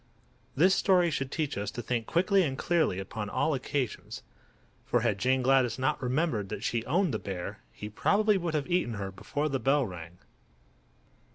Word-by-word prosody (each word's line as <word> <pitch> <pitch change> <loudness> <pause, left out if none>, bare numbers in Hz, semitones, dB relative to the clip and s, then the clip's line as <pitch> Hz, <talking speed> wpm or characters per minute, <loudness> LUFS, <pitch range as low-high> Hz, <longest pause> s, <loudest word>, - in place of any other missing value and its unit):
This 180 +7 +5
story 180 -4 +3
should 135 -2 -2
teach 155 -3 -2
us 100 - -2
to 120 - -5
think 115 -1 -2
quickly 190 +3 +3
and 135 -7 -1
clearly 165 - +1
upon 105 +2 -5
all 155 +8 +1
occasions; 130 -2 -3 0.6
for - - +1
had 100 - 0
Jane 130 +3 +2
Gladys 130 -3 +3
not 130 0 0
remembered 125 - 0
that 100 - -5
she 115 -2 -1
owned 175 +1 +2
the 110 - -1
bear 90 -3 -5
he 105 - -8
probably 205 - +2
would 170 -4 -1
have 145 -2 0
eaten 175 -10 0
her 100 -1 -4
before 110 +10 -3
the 135 -3 -1
bell 135 +1 +2
rang. 90 -3 -9
130 Hz, 180 wpm, -29 LUFS, 110-165 Hz, 0.6 s, This